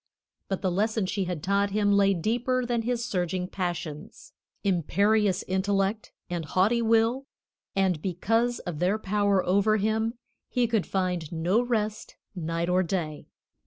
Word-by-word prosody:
But 195 0 -3
the 185 - +1
lesson 215 +3 0
she 195 +1 -1
had 175 -4 -4
taught 200 +1 +2
him 205 0 +1
lay 200 -1 +4
deeper 245 +7 0
than 240 -1 0
his 235 0 -1
surging 180 -4 -1
passions, 175 -5 -5 0.3
imperious 200 +2 +2
intellect, 195 +2 0 0.2
and 175 -2 -3
haughty 190 +10 +2
will, 230 +4 +2 0.5
and 190 -5 +1
because 225 +7 0
of 170 -4 -6
their 185 +4 +2
power 205 -2 +1
over 200 +4 +3
him 220 +3 0 0.3
he 245 -1 +1
could 225 -4 0
find 180 -5 -1
no 175 +7 +1
rest 220 -3 -2 0.2
night 165 -1 -2
or 180 +1 +3
day. 165 -4 -3
195 Hz, 145 wpm, -27 LUFS, 180-220 Hz, 0.5 s, lay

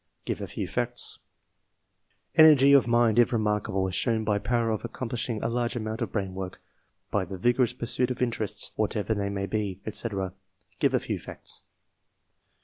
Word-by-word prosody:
(give - - -3
a - - -4
few - - -4
facts)? - - -2 1.1
Energy 150 -4 +8
of 135 -4 +6
mind, 120 -1 +4
if 120 - +5
remarkable; 105 -4 0
as 95 - -5
shown 110 +1 +1
by 105 -1 +1
power 115 +2 +1
of 110 - -2
accomplishing 120 -2 -3
a - - +1
large 120 +1 -1
amount 110 0 -3
of 115 - -2
brain 95 -3 -2
work, 95 -1 -6 0.5
by 100 - +1
the 95 +1 -6
vigorous 120 +4 +2
pursuit 125 +1 0
of 125 - -3
interests, 115 -4 -1
whatever 110 0 0
they 100 -1 -2
may 100 -1 -2
be, 100 -2 -2
&c. 115 - -1 0.7
(give - - +3
a - - +3
few - - -3
facts) - - -8
110 Hz, 170 wpm, -27 LUFS, 100-120 Hz, 1.1 s, Energy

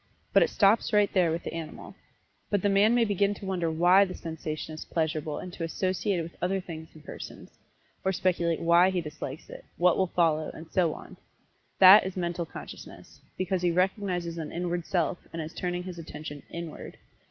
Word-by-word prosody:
But - - +6
it - - +4
stops 210 +2 +3
right 205 -1 +3
there 180 -3 +3
with 165 +1 -3
the - - -5
animal. 165 -2 -7 0.6
But 205 -3 0
the 205 - +3
man 205 +4 +4
may 240 -1 +4
begin 205 0 +1
to 200 - -9
wonder 180 -3 -1
why 175 +4 +5
the 185 -2 -4
sensation 160 -1 -5
is 155 - -7
pleasurable 155 -2 -2
and 180 - -7
to 170 - -5
associate 185 +3 -1
it 170 - -1
with 170 - -10
other 190 +2 0
things 160 -3 -8
and 155 -1 -15
persons; - - -9 0.5
or 190 - +2
speculate 175 -3 0
why 170 +2 +5
he 185 -1 0
dislikes 155 -3 -7
it, - - -10
what 180 -1 +4
will 190 - +3
follow, 160 -3 +1
and 160 0 -11
so 170 -4 +2
on - - -12 0.6
that 190 +3 +9
is 190 0 -5
Mental 170 -1 -2
Consciousness, - - -11 0.2
because 185 0 -1
he 175 - +2
recognizes 180 -1 -1
an 155 - -5
inward 175 -1 -3
self, 175 -1 0
and 165 - -6
is 160 0 -5
turning 180 0 -3
his 180 -2 -7
attention 150 -2 -8
inward. 170 -2 -7
175 Hz, 200 wpm, -28 LUFS, 165-190 Hz, 0.6 s, that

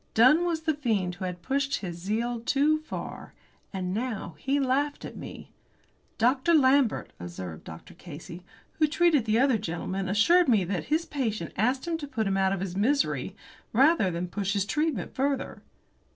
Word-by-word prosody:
Dunn 265 +10 +6
was 330 -2 -1
the 320 -1 +1
fiend 220 -11 -1
who 180 +1 -6
had 180 -1 -6
pushed 275 +1 0
his 175 -4 -5
zeal 225 +6 -2
too 285 +6 +2
far. 310 - -8 0.4
And 185 -2 -3
now 220 -6 -3
he 275 +2 0
laughed 280 +2 0
at - - -8
me! - - -9 0.7
"Dr. 260 +8 +3
Lambert," 270 -4 +3
observed 85 -1 -7
Dr. 80 +1 -11
Casey, 170 +1 -10 0.4
"who 310 - +5
treated 310 -5 +3
the 220 0 +2
other 255 -2 +3
gentleman, 185 +1 -3
assured 335 - +4
me 215 -6 +4
that 180 0 -3
his 320 +2 0
patient 220 - -3
asked 255 - 0
him 330 -1 -1
to 290 - -6
put 230 -6 -2
him 195 -1 0
out 190 0 +2
of 195 -2 -2
his 185 -2 -4
misery 270 +9 0 0.4
rather 270 - +4
than 175 +1 -3
push 200 +2 -2
his 200 -2 0
treatment 300 - -1
further." 275 0 -2
230 Hz, 175 wpm, -27 LUFS, 190-285 Hz, 0.7 s, Dunn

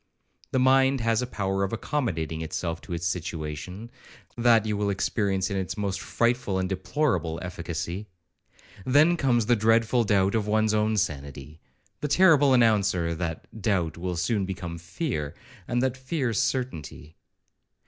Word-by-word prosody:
The - - -1
mind 130 +1 +4
has 115 0 +1
a 125 - -3
power 95 -4 -1
of 95 - -1
accommodating 95 - -2
itself 80 +1 -3
to 90 - -7
its 85 0 -3
situation, 85 +4 -4 0.4
that 115 -2 +4
you 105 -1 -1
will 100 0 0
experience 95 0 0
in 100 - -1
its 95 +2 -3
most 100 -2 -2
frightful 120 -4 0
and 95 0 0
deplorable 95 - -1
efficacy. 90 +2 -5 0.8
Then 150 - +4
comes 125 -8 +2
the 120 +2 +4
dreadful 115 +2 +3
doubt 100 -2 +2
of 110 -2 0
one's 110 0 +2
own 110 0 +1
sanity, 70 -2 -4 0.4
the 150 - -2
terrible 145 -4 +5
announcer 100 -8 +3
that 80 -1 -4
that 110 - -10
doubt 90 -6 0
will 90 +1 -3
soon 100 +4 0
become 90 -3 -5
fear, 85 - -4 0.3
and 120 +1 0
that 130 -1 0
fear 130 -2 -2
certainty. 90 - -3
100 Hz, 150 wpm, -26 LUFS, 85-120 Hz, 0.8 s, terrible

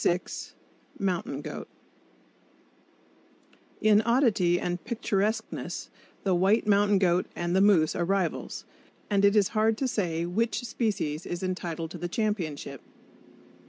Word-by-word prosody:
Mountain 195 +4 -2
Goat - - -6 2.1
In 215 -1 +5
oddity 220 -8 +3
and 175 0 -3
picturesqueness, 220 -1 -2 0.3
the 190 - +2
white 195 +6 +3
mountain 205 -1 +4
goat 180 -1 +2
and 175 +1 -1
the 190 - +4
moose 190 -7 +4
are 175 - 0
rivals; 185 -2 -1 0.5
and 200 -1 +3
it 200 +1 +5
is 205 -3 +4
hard 220 0 +2
to 265 - 0
say 170 -8 -1
which 225 +8 -1
species 200 -10 -2
is 175 +1 -4
entitled 170 -3 -3
to - - -7
the 175 - -3
championship. 170 - -2
195 Hz, 125 wpm, -28 LUFS, 175-215 Hz, 2.1 s, In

